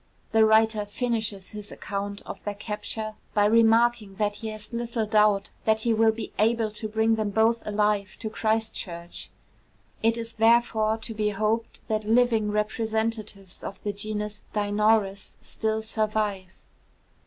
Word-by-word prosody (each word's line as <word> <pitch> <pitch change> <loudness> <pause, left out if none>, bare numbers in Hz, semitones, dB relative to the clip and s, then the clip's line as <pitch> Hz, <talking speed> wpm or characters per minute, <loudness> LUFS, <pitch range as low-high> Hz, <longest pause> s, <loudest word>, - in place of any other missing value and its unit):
The 220 0 +5
writer 220 0 +4
finishes 220 -3 -2
his 210 -1 -8
account 200 0 -5
of - - -8
their 205 -1 -3
capture 215 +1 -4 0.2
by 205 -1 +4
remarking 225 -1 +4
that 205 0 -1
he 225 - -6
has 215 +1 -8
little 235 -1 -1
doubt 210 -2 +3
that 220 0 +3
he 235 - +2
will 220 0 +4
be 220 +1 -7
able 225 0 +2
to 215 +1 -5
bring 220 +1 +2
them 215 -1 0
both 225 +2 +2
alive 210 -1 0
to 225 - -3
Christchurch. 215 -6 -2 0.7
It 225 +1 +2
is 230 0 -6
therefore 225 -1 +3
to 225 0 -5
be 210 -1 0
hoped 215 +3 -1
that 215 -2 0
living 225 -2 +3
representatives 215 -2 -2
of 195 - -6
the 205 - -2
genus 210 0 -4
Dinornis 205 -1 +1
still 220 0 -2
survive. 215 -4 -1
215 Hz, 145 wpm, -26 LUFS, 210-225 Hz, 0.7 s, The